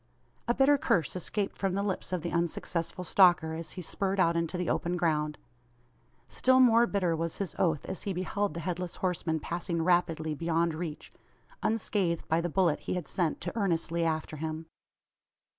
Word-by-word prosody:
A 240 - +2
bitter 280 +1 +4
curse 170 - +1
escaped 195 +3 -2
from 195 -2 -1
the 200 - 0
lips 195 -2 -3
of 180 -4 -2
the 170 - -3
unsuccessful 170 +1 -2
stalker 175 -3 +4
as 160 -1 -5
he 180 - -6
spurred 195 +3 -2
out 170 -2 +3
into 170 +1 -1
the 180 -1 -2
open 175 +1 0
ground. 150 -3 0 0.9
Still 260 0 +3
more 235 -2 +6
bitter 180 -6 +1
was 165 0 -3
his 195 -5 -3
oath, 165 -5 +1
as 190 - -5
he 200 - -3
beheld 195 +2 -2
the 170 - -4
Headless 180 0 -3
Horseman 175 -3 -1
passing 170 +1 -2
rapidly 165 -3 +1
beyond 165 +2 0
reach 155 -1 -6 0.5
unscathed 200 -6 0
by 160 +1 +2
the 175 - -2
bullet 170 -2 +2
he - - -3
had 180 - -4
sent 170 -4 -1
to 175 +4 -4
earnestly 170 -5 0
after 160 -1 -2
him. 160 +1 -4
175 Hz, 175 wpm, -30 LUFS, 165-190 Hz, 0.9 s, more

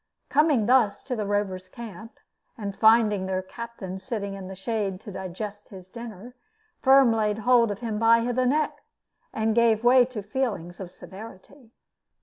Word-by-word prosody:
Coming 290 -6 +3
thus 235 -4 +3
to 260 -2 -3
the 210 -3 -3
Rovers' 190 -2 -2
camp, 225 0 -10 0.4
and 200 -3 -5
finding 220 -4 +4
their 185 0 -2
captain 195 -3 -8
sitting 200 -3 -4
in 195 -1 -8
the 190 - -8
shade 195 -1 -3
to 205 - -9
digest 200 +3 -7
his 185 -2 -12
dinner, 235 +1 -9 0.5
Firm 265 -3 +5
laid 210 -2 0
hold 235 +1 +4
of 205 +2 -5
him 220 -3 -3
by 230 +1 +5
the 255 +1 +1
neck, 300 +4 0 0.5
and 220 0 0
gave 230 -1 +3
way 250 +1 +6
to 240 -5 -7
feelings 205 -7 -3
of 190 -3 -7
severity. 220 +7 -13
220 Hz, 160 wpm, -25 LUFS, 195-235 Hz, 0.5 s, way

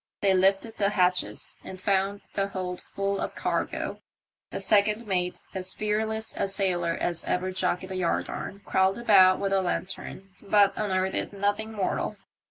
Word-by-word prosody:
They 195 -1 +4
lifted 195 +4 +2
the 200 -1 +3
hatches 180 -2 0
and 185 - -8
found 195 +1 0
the 195 -1 0
hold 185 -2 -4
full 195 0 -2
of - - -3
cargo. - - -2 0.5
The - - -4
second 210 +2 +3
mate, 180 -3 -1
as 185 -1 -1
fearless 220 +1 -1
a - - 0
sailor 180 -4 0
as 170 -1 -1
ever 185 +1 -1
jockeyed 185 0 0
a - - -3
yardarm, 185 +2 -2
crawled 190 +1 +2
about 190 -5 +6
with 195 -1 0
a 195 - +3
lantern 190 +1 -4
but 200 -1 +4
unearthed 190 -1 -1
nothing 205 +2 -1
mortal. 200 -3 -2
195 Hz, 155 wpm, -27 LUFS, 185-205 Hz, 0.5 s, about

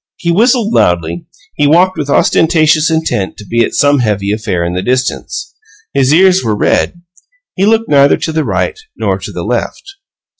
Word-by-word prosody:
He 170 - -1
whistled 230 +3 +2
loudly; 85 0 0 0.3
he 145 - +1
walked 180 +5 +3
with 150 -3 -4
ostentatious 155 +1 +2
intent 160 -12 -2
to 105 - -11
be 115 +4 +1
at - - -3
some 145 0 +3
heavy 105 -4 -1
affair 105 -5 -2
in 85 - -3
the 90 - -2
distance; 125 - -3 0.4
his 135 -1 +2
ears 185 +3 +4
were 110 -3 -1
red. 175 +9 0 0.5
He 195 +1 +1
looked 225 +1 +1
neither 140 -1 +4
to 160 - -4
the 155 0 -1
right 435 - -2 0.2
nor - - -1
to - - -8
the - - -6
left. 390 0 -4
145 Hz, 180 wpm, -12 LUFS, 105-180 Hz, 0.5 s, ears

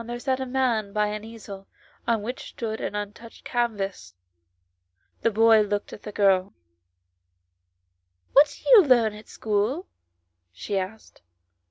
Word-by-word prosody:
67 230 - -10
there 240 0 -4
sat 260 +1 -1
a 265 - -2
man 240 -6 0
by 210 0 +2
an 210 0 -5
easel, 210 -3 -10 0.4
on 230 -3 +1
which 245 +4 -6
stood 220 -2 -5
an - - -4
untouched 210 +3 -7
canvas. 200 - -2 1.1
The - - +3
boy 225 0 +5
looked 205 0 -2
at - - -10
the 210 - -8
girL 195 -2 +2 1.8
"What 285 +2 +5
do - - -11
you 445 -6 +10
learn 240 -7 +4
at 210 0 -13
school? 220 - -1 0.3
" 85 0 -52
she 200 - -5
asked. 195 +3 -5
215 Hz, 150 wpm, -25 LUFS, 200-240 Hz, 1.8 s, you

